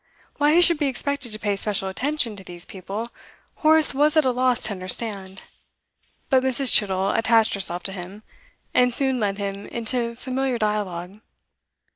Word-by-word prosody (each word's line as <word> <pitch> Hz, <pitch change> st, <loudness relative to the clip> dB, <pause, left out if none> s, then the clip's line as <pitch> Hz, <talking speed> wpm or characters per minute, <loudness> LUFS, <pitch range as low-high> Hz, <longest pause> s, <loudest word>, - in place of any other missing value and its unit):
Why 295 Hz, +1 st, +2 dB
he 350 Hz, -, +5 dB
should 340 Hz, -3 st, +4 dB
be 290 Hz, -, 0 dB
expected 275 Hz, -1 st, -1 dB
to 215 Hz, -, -5 dB
pay 205 Hz, -2 st, -2 dB
special 200 Hz, -1 st, -3 dB
attention 250 Hz, +2 st, -1 dB
to 195 Hz, -, -11 dB
these 175 Hz, -1 st, -7 dB
people, 200 Hz, +5 st, -7 dB, 0.5 s
Horace 315 Hz, -1 st, +6 dB
was 295 Hz, +3 st, +1 dB
at 310 Hz, -, +4 dB
a 255 Hz, -, +2 dB
loss 250 Hz, -1 st, 0 dB
to 215 Hz, -, +1 dB
understand; 190 Hz, 0 st, -2 dB, 0.8 s
but 260 Hz, -1 st, +3 dB
Mrs. 260 Hz, 0 st, +3 dB
Chittle 195 Hz, -1 st, +3 dB
attached 225 Hz, -1 st, +2 dB
herself 175 Hz, -3 st, 0 dB
to 195 Hz, -, -4 dB
him, 190 Hz, +3 st, -9 dB, 0.5 s
and 250 Hz, -1 st, +2 dB
soon 265 Hz, -2 st, +2 dB
led 200 Hz, -2 st, -2 dB
him 200 Hz, 0 st, -6 dB
into 235 Hz, 0 st, -4 dB
familiar 260 Hz, +1 st, -3 dB
dialogue. 205 Hz, -3 st, -4 dB
225 Hz, 165 wpm, -22 LUFS, 195-260 Hz, 0.8 s, Horace